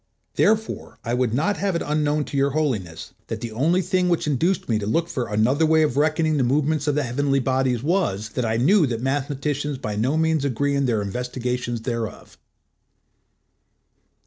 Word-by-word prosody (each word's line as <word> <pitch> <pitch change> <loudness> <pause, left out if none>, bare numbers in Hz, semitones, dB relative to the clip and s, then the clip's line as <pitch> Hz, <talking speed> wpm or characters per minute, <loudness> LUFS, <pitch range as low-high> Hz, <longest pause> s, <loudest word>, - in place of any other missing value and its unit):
Therefore 220 +1 0
I 120 - -2
would 125 -2 +1
not 155 - 0
have 195 -3 -1
it 170 - -1
unknown 150 0 +1
to 145 - -8
Your 140 0 +3
Holiness, 95 - -2
that - - -4
the 115 - -5
only 165 +11 +1
thing 180 0 +1
which 170 - +1
induced 160 +6 0
me 110 -3 +1
to 100 - -4
look 165 +10 +1
for 130 -7 -3
another 115 +8 +2
way 160 0 +4
of 145 -5 0
reckoning 155 +1 +2
the 135 - +2
movements 145 +3 +1
of 145 - +2
the 150 - +1
heavenly 135 +3 0
bodies 130 -2 0
was 145 - 0
that 125 +3 -3
I 110 -1 0
knew 160 - +4
that 115 -2 -3
mathematicians 145 +1 -2
by 105 -5 -4
no 125 +9 +1
means 160 -2 +1
agree 140 +1 0
in 140 -1 +1
their 110 -4 0
investigations 125 +2 -3
thereof. 115 -2 -5
140 Hz, 185 wpm, -23 LUFS, 120-155 Hz, -, way